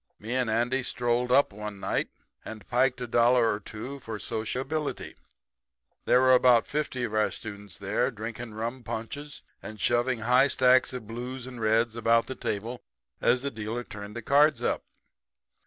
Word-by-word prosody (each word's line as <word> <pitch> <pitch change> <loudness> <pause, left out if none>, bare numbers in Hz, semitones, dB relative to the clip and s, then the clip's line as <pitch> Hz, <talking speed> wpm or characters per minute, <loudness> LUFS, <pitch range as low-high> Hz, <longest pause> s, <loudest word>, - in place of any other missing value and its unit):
Me 110 +4 -5
and 125 -3 0
Andy 120 +4 +1
strolled 125 0 0
up 135 -4 +4
one 105 -1 -7
night - - -1 0.3
and 110 -2 -9
piked 125 0 +2
a - - -2
dollar 120 -1 +3
or 105 - -4
two 110 +7 -8
for 115 -4 -6
sociability. 130 +8 -3 0.9
There 125 - +5
were 130 0 +6
about 125 -2 +5
fifty 145 -4 -2
of 110 -3 -3
our 110 0 +2
students 100 -3 -8
there 105 +6 0
drinking 115 -1 -7
rum 115 +4 -4
punches 140 +6 -6 0.2
and 110 0 -9
shoving 120 0 +1
high 125 +4 +4
stacks 130 -1 +4
of 125 -4 -6
blues 125 +2 -6
and 125 -2 -8
reds 110 +1 +2
about 115 0 +3
the - - -5
table 115 0 -4 0.4
as 125 +2 +3
the 140 - -2
dealer 110 +2 -4
turned 105 -1 -9
the 120 - -5
cards 140 -1 +4
up. - - 0
120 Hz, 170 wpm, -27 LUFS, 110-130 Hz, 0.9 s, were